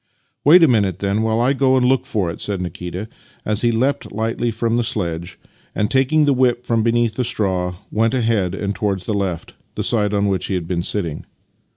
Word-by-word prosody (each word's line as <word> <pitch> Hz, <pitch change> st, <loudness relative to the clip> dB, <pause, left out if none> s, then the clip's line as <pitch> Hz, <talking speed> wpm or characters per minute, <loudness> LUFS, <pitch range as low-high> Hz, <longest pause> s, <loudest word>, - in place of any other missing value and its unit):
" -, -, -48 dB
Wait 165 Hz, +4 st, +7 dB
a -, -, +7 dB
minute, 100 Hz, -, +2 dB
then, 100 Hz, +2 st, -1 dB
while 110 Hz, 0 st, +1 dB
I 125 Hz, +3 st, +3 dB
go 130 Hz, -1 st, +3 dB
and 125 Hz, -, +2 dB
look 130 Hz, 0 st, +2 dB
for 105 Hz, -10 st, -1 dB
it," -, -, -9 dB
said 100 Hz, -2 st, -2 dB
Nikita 90 Hz, +3 st, -5 dB, 0.4 s
as 105 Hz, 0 st, -1 dB
he 120 Hz, -, +2 dB
leapt 130 Hz, +5 st, -1 dB
lightly 115 Hz, +3 st, -1 dB
from 115 Hz, +1 st, -1 dB
the 120 Hz, -, +1 dB
sledge 85 Hz, -7 st, -3 dB, 0.4 s
and, 105 Hz, +2 st, 0 dB
taking 135 Hz, +4 st, +3 dB
the 145 Hz, -, +3 dB
whip 125 Hz, -1 st, +1 dB
from 115 Hz, -2 st, +1 dB
beneath 115 Hz, 0 st, +1 dB
the 125 Hz, -, -1 dB
straw, 95 Hz, -5 st, -1 dB, 0.2 s
went 115 Hz, +3 st, +1 dB
ahead 110 Hz, -7 st, 0 dB
and 100 Hz, 0 st, -2 dB
towards 100 Hz, -3 st, -2 dB
the 110 Hz, -, -2 dB
left 95 Hz, -5 st, -3 dB
— -, -, -43 dB
the -, -, -2 dB
side 105 Hz, -3 st, +1 dB
on 100 Hz, 0 st, +1 dB
which 95 Hz, -2 st, -1 dB
he 95 Hz, -, -1 dB
had 85 Hz, -3 st, -3 dB
been 85 Hz, -1 st, -1 dB
sitting. 85 Hz, -4 st, -3 dB
110 Hz, 225 wpm, -20 LUFS, 95-120 Hz, 0.4 s, Wait